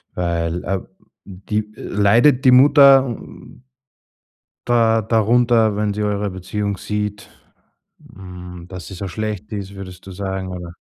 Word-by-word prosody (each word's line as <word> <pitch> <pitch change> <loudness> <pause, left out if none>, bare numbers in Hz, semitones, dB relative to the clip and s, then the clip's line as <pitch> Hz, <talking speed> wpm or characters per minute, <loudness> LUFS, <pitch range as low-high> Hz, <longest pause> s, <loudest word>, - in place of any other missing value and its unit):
weil, 85 -1 -2
äh, 95 +1 -2 0.5
di 105 +3 -4
leidet 115 +7 +2
die 130 - +7
Mutter 135 +1 +7
n 120 +1 -10 1.0
da 115 -2 +3
darunter, 115 0 +2
wenn 105 0 -1
sie 105 +1 -3
eure 105 0 -1
Beziehung 100 +2 -4
sieht, 105 0 -4 0.9
hm, 90 -2 -10
dass 90 -2 -9
sie - - -9
so 95 +2 -6
schlecht 105 +1 -5
ist, 100 -2 -6
würdest 95 -2 -10
du 95 - -9
sagen, 95 0 -4
oder 90 -2 -7
100 Hz, 135 wpm, -19 LUFS, 95-110 Hz, 1.0 s, die